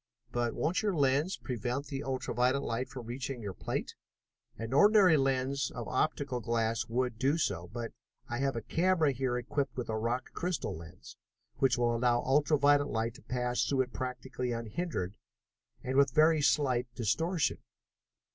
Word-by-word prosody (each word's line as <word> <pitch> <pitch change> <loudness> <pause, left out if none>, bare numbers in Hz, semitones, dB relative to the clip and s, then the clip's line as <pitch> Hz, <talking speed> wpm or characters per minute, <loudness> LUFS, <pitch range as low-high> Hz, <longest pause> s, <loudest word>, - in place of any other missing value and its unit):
"But 120 -1 -1
won't 165 +4 0
your 205 -4 0
lens 145 +5 +2
prevent 125 +2 -3
the 140 -2 -4
ultra 130 -1 -3
violet 125 +3 +2
light 115 +3 -2
from 125 -3 -8
reaching 125 +2 -4
your 100 -2 -4
plate?" - - -4 0.6
"An 115 +2 -5
ordinary 195 +2 +6
lens 135 -1 +1
made - - -7
of 120 - -5
optical 135 -2 0
glass 115 0 0
would 125 -1 -1
do 140 +5 +2
so, 85 - -1
but 115 +3 -5 0.4
I 120 0 -3
have 135 -2 0
a 115 - -3
camera 170 -2 +2
here 130 -1 -1
equipped 135 +3 -2
with 125 -3 -3
a 110 - -1
rock 120 +3 -2
crystal 180 0 -2
lens, 80 0 -12 0.4
which 135 -2 +3
will 120 -1 +2
allow 120 0 +2
ultra 145 +3 +3
violet 145 0 +4
light 115 +1 -1
to 140 - -15
pass 125 -2 -1
through 135 -2 +1
it 130 -1 -3
practically 125 -1 -4
unhindered, 115 - -3 0.7
and 130 +1 -1
with 140 0 +6
very 155 0 +5
slight 130 -4 +2
distortion. 160 - 0
130 Hz, 170 wpm, -31 LUFS, 120-145 Hz, 0.7 s, ordinary